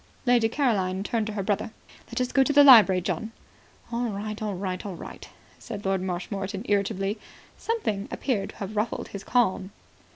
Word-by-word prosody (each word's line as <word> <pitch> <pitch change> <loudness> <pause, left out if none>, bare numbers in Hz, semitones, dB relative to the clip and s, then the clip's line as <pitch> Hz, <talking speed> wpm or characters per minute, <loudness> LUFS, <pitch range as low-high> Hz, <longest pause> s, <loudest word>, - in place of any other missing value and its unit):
Lady 240 -2 +4
Caroline 195 -8 0
turned 220 0 -1
to 215 - -4
her 200 -2 -2
brother. 205 +2 -1 0.4
"Let - - -4
us 250 0 -1
go 270 - +4
to 265 - +3
the 290 0 +7
library, 215 -9 +8
John." 220 +5 -3 0.6
"All 240 +1 -1
right. 210 +1 -5
All 210 -2 -2
right. 185 -1 -4
All 195 -3 -6
right," - - -10 0.3
said 210 -4 -8
Lord 190 -1 +1
Marshmoreton 195 +3 -4
irritably. 200 0 0 0.4
Something 220 - -2
appeared 210 -8 -2
to - - -12
have 205 +1 -6
ruffled 215 +2 -2
his 200 -1 -7
calm. 195 -6 +1
205 Hz, 175 wpm, -26 LUFS, 195-235 Hz, 0.6 s, library